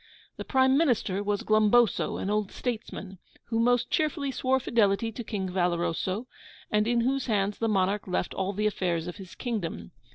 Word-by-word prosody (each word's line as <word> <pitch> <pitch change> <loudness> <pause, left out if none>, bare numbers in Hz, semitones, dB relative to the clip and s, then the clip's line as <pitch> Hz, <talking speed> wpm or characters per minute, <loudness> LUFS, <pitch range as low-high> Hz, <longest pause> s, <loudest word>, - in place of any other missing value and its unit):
The - - -5
Prime 265 0 +3
Minister 230 - +1
was 205 0 -1
Glumboso, 215 +1 +3
an 195 - -2
old 210 -2 0
statesman, 210 -5 -5 0.3
who 225 -1 0
most 245 +1 +2
cheerfully 295 -2 0
swore 265 0 +1
fidelity 225 -3 +1
to 240 +2 -6
King 200 -4 -3
Valoroso, 180 +3 -1 0.5
and 210 +1 +2
in 240 0 +2
whose 270 +3 0
hands 205 -2 0
the 225 - +1
monarch 195 0 +1
left 180 -1 -1
all 190 0 -1
the 210 +2 -2
affairs 175 -5 0
of 175 +1 -6
his 190 -4 -11
kingdom. 175 - -4
210 Hz, 170 wpm, -28 LUFS, 190-240 Hz, 0.5 s, Prime